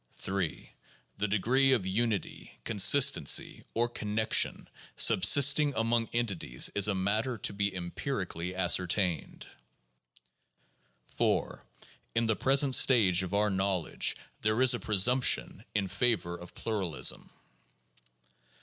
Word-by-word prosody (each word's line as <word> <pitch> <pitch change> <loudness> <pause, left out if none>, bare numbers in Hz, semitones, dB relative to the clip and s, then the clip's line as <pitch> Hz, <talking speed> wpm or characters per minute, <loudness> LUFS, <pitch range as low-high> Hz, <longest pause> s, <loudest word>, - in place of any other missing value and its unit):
3. 95 -4 -5 0.5
The 105 - -1
degree 125 +7 +1
of 110 -8 -1
unity, 105 +2 -4
consistency, 135 +6 +3
or 120 +1 +1
connection 110 -2 -1 0.3
subsisting 145 +1 +4
among 115 +1 -1
entities 100 - -1
is 100 0 +3
a 100 - -1
matter 110 +6 -2
to 100 - -2
be 100 -1 -3
empirically 90 - -6
ascertained. 90 -1 -1 1.7
4. - - -2 0.5
In 115 0 +1
the 110 -1 0
present 135 +2 +2
stage 105 -10 +4
of 95 +1 -4
our 105 0 +1
knowledge 95 -2 -1 0.2
there 110 +2 -1
is 130 - +5
a 120 - -4
presumption 115 +5 +1
in 100 -2 -1
favor 100 -3 -1
of 90 0 -13
pluralism. 95 -9 -2
105 Hz, 110 wpm, -29 LUFS, 95-120 Hz, 1.7 s, is